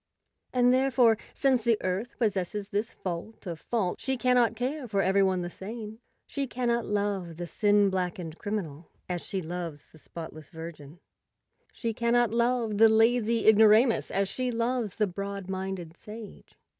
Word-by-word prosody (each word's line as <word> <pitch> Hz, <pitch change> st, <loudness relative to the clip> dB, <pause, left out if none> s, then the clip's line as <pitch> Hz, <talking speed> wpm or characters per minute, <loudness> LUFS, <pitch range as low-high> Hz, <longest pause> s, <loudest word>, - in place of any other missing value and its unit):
And 250 Hz, 0 st, +4 dB
therefore, 255 Hz, -3 st, +4 dB, 0.2 s
since 260 Hz, -4 st, +2 dB
the 230 Hz, -1 st, +3 dB
Earth 190 Hz, +6 st, -2 dB
possesses 205 Hz, -2 st, -1 dB
this 205 Hz, +2 st, -1 dB
fault 185 Hz, +5 st, -6 dB
of 170 Hz, -3 st, -5 dB
faults, 210 Hz, -7 st, -2 dB
she 265 Hz, 0 st, 0 dB
cannot 245 Hz, -2 st, +3 dB
care 255 Hz, +3 st, -3 dB
for 200 Hz, -3 st, +1 dB
every 195 Hz, +2 st, +3 dB
one 190 Hz, -2 st, +2 dB
the 175 Hz, -, -4 dB
same; 220 Hz, +3 st, -7 dB, 0.3 s
she 280 Hz, -1 st, -3 dB
cannot 240 Hz, -1 st, -1 dB
love 200 Hz, -5 st, -1 dB
the 175 Hz, -, -4 dB
sin 205 Hz, +2 st, +3 dB
blackened 180 Hz, -3 st, -3 dB
criminal 175 Hz, -7 st, -4 dB, 0.2 s
as 180 Hz, -2 st, -3 dB
she 190 Hz, -2 st, -4 dB
loves 165 Hz, -3 st, -5 dB
the 160 Hz, -, -17 dB
spotless 155 Hz, -1 st, -9 dB
virgin; 160 Hz, -2 st, -9 dB, 0.7 s
she 230 Hz, -2 st, -3 dB
cannot 235 Hz, 0 st, +2 dB
love 235 Hz, -2 st, +1 dB
the 225 Hz, 0 st, +8 dB
lazy 225 Hz, 0 st, +3 dB
igno¬ 220 Hz, 0 st, +7 dB
ramus 230 Hz, +3 st, +4 dB
as 195 Hz, +1 st, 0 dB
she 255 Hz, +5 st, -2 dB
loves 235 Hz, -3 st, -1 dB
the 215 Hz, -, +2 dB
broad 200 Hz, 0 st, -5 dB
minded 190 Hz, -3 st, -4 dB
sage. 215 Hz, +1 st, -11 dB
210 Hz, 160 wpm, -28 LUFS, 185-235 Hz, 0.7 s, the